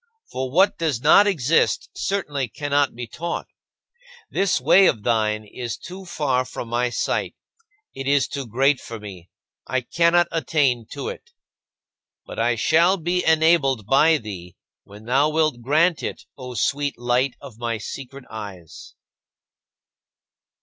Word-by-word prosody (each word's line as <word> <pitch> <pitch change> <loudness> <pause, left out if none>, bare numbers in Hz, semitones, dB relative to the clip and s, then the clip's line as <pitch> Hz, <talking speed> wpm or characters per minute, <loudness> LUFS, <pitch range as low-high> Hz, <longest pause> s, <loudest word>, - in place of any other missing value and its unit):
For 130 0 -3
what 185 +9 +3
does 155 -8 0
not 180 +8 +6
exist 165 -5 +1
certainly 150 -9 -2
cannot 145 +3 0
be 120 0 -5
taught. 170 +8 -5 0.9
This 195 -1 +1
way 195 0 +6
of 110 - 0
thine 110 -2 0
is 120 +2 -6
too 185 +2 -10
far 140 -7 0
from 125 -2 -7
my 120 +1 0
sight; - - -2 0.6
it 135 0 -6
is 140 -3 +3
too 140 -3 -5
great 135 +5 +2
for 115 -1 -8
me, 95 -4 -11 0.4
I 130 -1 0
cannot 170 +6 +2
attain 140 -8 0
to 435 - -4
it. 475 -1 -9 1.0
But - - -8
I - - +2
shall 170 +4 +3
be 180 +1 -1
enabled 160 -7 +3
by 155 +7 +4
thee, 90 - -9 0.3
when 105 +2 -14
thou 135 +5 +3
wilt 155 -5 0
grant 155 +7 +2
it, - - -5
O 125 -2 -8
sweet 140 +5 -1
Light 120 +2 0
of 125 -6 -12
my 115 -1 -2
secret 135 +3 -8
eyes. 95 -7 -10
135 Hz, 145 wpm, -22 LUFS, 120-160 Hz, 1.0 s, not